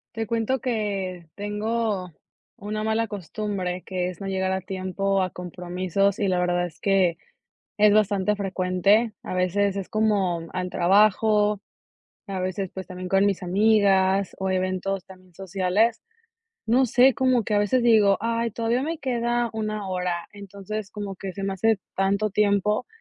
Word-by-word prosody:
Te 225 Hz, 0 st, -2 dB
cuento 230 Hz, +4 st, 0 dB
que 200 Hz, -7 st, -3 dB
tengo 210 Hz, -2 st, -2 dB, 0.5 s
una 215 Hz, 0 st, -4 dB
mala 220 Hz, +1 st, +1 dB
costumbre, 195 Hz, -2 st, -4 dB
que 180 Hz, -1 st, -2 dB
es 180 Hz, -, -9 dB
no 195 Hz, -, -6 dB
llegar 190 Hz, -1 st, -1 dB
a 190 Hz, 0 st, -1 dB
tiempo 190 Hz, +1 st, -1 dB
a 185 Hz, -, 0 dB
compromisos, 180 Hz, +2 st, -2 dB
y 205 Hz, -4 st, 0 dB
la 185 Hz, -1 st, +1 dB
verdad 175 Hz, 0 st, +1 dB
es 170 Hz, 0 st, -10 dB
que 190 Hz, -4 st, +2 dB, 0.6 s
es 210 Hz, 0 st, +5 dB
bastante 210 Hz, -1 st, +2 dB
frecuente. 195 Hz, +3 st, +1 dB
A -, -, -5 dB
veces 190 Hz, +2 st, +1 dB
es 195 Hz, -, -4 dB
como 200 Hz, -6 st, +1 dB
al 180 Hz, 0 st, -3 dB
trabajo, 210 Hz, +3 st, +3 dB, 0.7 s
a 195 Hz, -1 st, -4 dB
veces, 185 Hz, +1 st, -2 dB
pues 190 Hz, -1 st, -7 dB
también 185 Hz, -1 st, -7 dB
con 195 Hz, +1 st, +3 dB
mis 200 Hz, -2 st, 0 dB
amigas 195 Hz, 0 st, +3 dB
o 190 Hz, 0 st, -1 dB
eventos 185 Hz, 0 st, -1 dB
también 185 Hz, -1 st, -16 dB
sociales. 195 Hz, +5 st, 0 dB, 0.6 s
No 250 Hz, +4 st, +3 dB
sé 250 Hz, +3 st, +5 dB
cómo 255 Hz, -1 st, +2 dB
que 210 Hz, -, -2 dB
a -, -, +4 dB
veces 225 Hz, +5 st, +2 dB
digo: 215 Hz, -4 st, +5 dB
"Ay, 230 Hz, 0 st, -1 dB
todavía 230 Hz, +3 st, 0 dB
me 325 Hz, +1 st, -3 dB
queda 240 Hz, -3 st, -1 dB
una 215 Hz, -2 st, -3 dB
hora". 180 Hz, -2 st, -2 dB
Entonces 200 Hz, +1 st, -7 dB
como 205 Hz, -2 st, -5 dB
que 190 Hz, 0 st, -6 dB
se 195 Hz, -, -7 dB
me 195 Hz, 0 st, -1 dB
hace 220 Hz, +2 st, +1 dB, 0.2 s
tanto 200 Hz, +2 st, +1 dB
tiempo 205 Hz, +1 st, +1 dB
200 Hz, 160 wpm, -24 LUFS, 185-215 Hz, 0.7 s, es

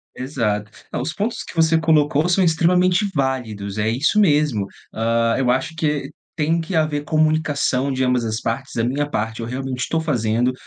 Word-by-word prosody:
Exato. 110 Hz, -6 st, -2 dB, 0.2 s
Ah, -, -, -2 dB
os 160 Hz, -, -3 dB
pontos 215 Hz, +6 st, -2 dB
que -, -, -11 dB
você 165 Hz, 0 st, +3 dB
colocou 155 Hz, -1 st, +2 dB
são 180 Hz, +2 st, +3 dB
extremamente 180 Hz, +4 st, +3 dB
válidos, 115 Hz, -8 st, -2 dB
é 105 Hz, +1 st, +1 dB
isso 140 Hz, -, +2 dB
mesmo. 150 Hz, -, +3 dB, 0.3 s
Hã, 115 Hz, +1 st, +1 dB
eu 130 Hz, -2 st, +1 dB
acho 130 Hz, +5 st, 0 dB
que 150 Hz, -3 st, -1 dB, 0.3 s
tem 165 Hz, +2 st, +1 dB
que 165 Hz, +3 st, -4 dB
haver 155 Hz, -2 st, +1 dB
comunicação, 155 Hz, -4 st, +1 dB
de 130 Hz, 0 st, 0 dB
ambas 125 Hz, -2 st, +1 dB
as 110 Hz, 0 st, -2 dB
partes. 130 Hz, +4 st, -3 dB
A 115 Hz, -, +1 dB
minha 145 Hz, +4 st, -1 dB
parte, 110 Hz, 0 st, -3 dB
eu 115 Hz, -, -3 dB
realmente 130 Hz, +1 st, -3 dB
tô 165 Hz, -, 0 dB
fazendo. 120 Hz, -5 st, +1 dB
140 Hz, 180 wpm, -21 LUFS, 115-160 Hz, 0.3 s, você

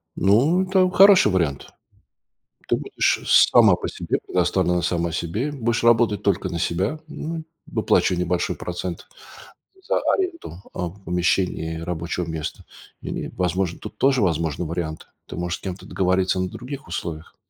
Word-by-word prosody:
Ну, 130 Hz, -, +3 dB
это 185 Hz, -1 st, +3 dB
хороший 190 Hz, -, +6 dB
вариант. 80 Hz, -7 st, -1 dB, 0.9 s
Ты -, -, +2 dB
будешь -, -, 0 dB
сама -, -, +6 dB
по -, -, -5 dB
себе, -, -, -2 dB
предоставлена 90 Hz, 0 st, +1 dB
сама 85 Hz, -1 st, -1 dB
себе. 95 Hz, -, -2 dB
Будешь 120 Hz, -5 st, -1 dB
работать 115 Hz, -3 st, +3 dB
только 100 Hz, -1 st, +1 dB
на 85 Hz, -, -4 dB
себя, 95 Hz, -, -1 dB
м, 160 Hz, +1 st, -5 dB, 0.2 s
выплачивая 90 Hz, -1 st, +1 dB
небольшой 90 Hz, 0 st, -1 dB
процент 90 Hz, -1 st, -5 dB, 0.8 s
за -, -, +2 dB, 0.2 s
аренду, 335 Hz, -, -4 dB
а, 90 Hz, -, -3 dB
помещений 90 Hz, -3 st, -1 dB
рабочего 85 Hz, +1 st, -3 dB
места. 80 Hz, -2 st, -5 dB, 0.4 s
И, -, -, -4 dB
возможно, 90 Hz, -1 st, -1 dB
тут -, -, -10 dB
тоже 135 Hz, -3 st, +3 dB
возможны 80 Hz, -3 st, 0 dB
варианты. 80 Hz, -1 st, -4 dB, 0.2 s
Ты -, -, -8 dB
можешь 90 Hz, 0 st, -3 dB
с -, -, -25 dB
кем-то 95 Hz, -1 st, -6 dB
договориться 95 Hz, 0 st, +1 dB
на 95 Hz, -, -1 dB
других 125 Hz, +3 st, -8 dB
условиях. 85 Hz, -2 st, -6 dB
90 Hz, 140 wpm, -23 LUFS, 85-115 Hz, 0.9 s, хороший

